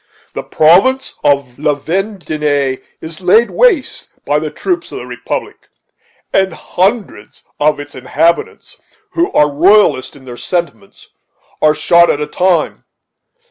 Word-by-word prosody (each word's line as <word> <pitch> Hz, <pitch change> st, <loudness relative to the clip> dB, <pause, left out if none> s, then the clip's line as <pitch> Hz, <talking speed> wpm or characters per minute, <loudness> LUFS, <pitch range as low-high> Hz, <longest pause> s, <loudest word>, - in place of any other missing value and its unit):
"The -, -, -4 dB
province 195 Hz, +12 st, +3 dB
of 140 Hz, -3 st, 0 dB
La 150 Hz, -1 st, +1 dB
Vendée 150 Hz, -5 st, -2 dB, 0.2 s
is 160 Hz, +2 st, -7 dB
laid 220 Hz, +6 st, +3 dB
waste 425 Hz, -, +1 dB, 0.2 s
by 145 Hz, +1 st, +1 dB
the 155 Hz, 0 st, -4 dB
troops 360 Hz, -, -3 dB
of -, -, -6 dB
the -, -, -7 dB
republic, -, -, -6 dB, 0.6 s
and 190 Hz, -3 st, +1 dB
hundreds 190 Hz, -, -2 dB, 0.2 s
of 150 Hz, 0 st, +2 dB
its 145 Hz, 0 st, -9 dB
inhabitants, 165 Hz, +6 st, -1 dB, 0.3 s
who 350 Hz, +3 st, 0 dB
are 150 Hz, -, +4 dB
royalists 170 Hz, -3 st, +3 dB
in 135 Hz, -2 st, -16 dB
their 120 Hz, -1 st, -9 dB
sentiments, 185 Hz, -, -5 dB, 0.5 s
are 155 Hz, 0 st, +4 dB
shot 170 Hz, +2 st, +4 dB
at 145 Hz, -, +1 dB
a 150 Hz, -, -1 dB
time. 175 Hz, +1 st, 0 dB
165 Hz, 135 wpm, -14 LUFS, 145-195 Hz, 0.6 s, are